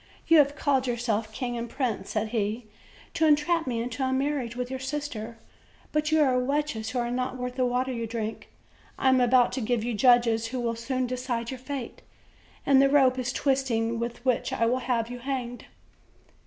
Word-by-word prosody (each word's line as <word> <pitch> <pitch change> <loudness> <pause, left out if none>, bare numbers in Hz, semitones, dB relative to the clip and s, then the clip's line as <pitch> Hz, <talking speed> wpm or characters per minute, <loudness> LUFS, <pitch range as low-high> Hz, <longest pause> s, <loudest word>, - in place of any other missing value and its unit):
You 330 -1 +6
have 285 0 +3
called 270 -4 +1
yourselves 230 -3 -1
king 245 +2 -4
and 235 0 -4
prince," 235 -7 -2
said 215 0 -1
he, 220 +1 -2 0.5
"to 325 - +2
en 300 - +7
trap 325 +1 -1
me 235 -2 -1
into 245 +2 -5
a 260 - 0
marriage 265 -3 -1
with 250 0 -4
your 260 - -3
sister; 260 -5 -5 0.5
but 305 0 0
you 315 0 +4
are 255 -3 +2
wretches 275 -4 -1
who 250 - -4
are 240 0 -1
not 255 +1 -2
worth 250 0 -4
the 255 -1 +1
water 255 +1 -1
you 230 -1 -3
drink. 220 -1 -5 0.5
I 265 - +3
am 260 -1 +4
about 245 0 +4
to 260 - -3
give 235 0 0
you 240 +1 -2
judges 230 -1 +4
who 255 +2 -4
will 235 -1 -1
soon 255 +2 -2
decide 245 -1 -3
your 260 - -6
fate; 260 -2 -6 0.6
and 270 -1 +6
the 275 - +5
rope 265 -2 +4
is 255 +1 -1
twisting 240 -5 0
with 235 +1 -5
which 255 -2 +1
I 230 - +1
will 250 +3 +1
have 240 -2 -1
you 245 - -6
hanged." 245 -2 -4
250 Hz, 205 wpm, -27 LUFS, 235-265 Hz, 0.6 s, en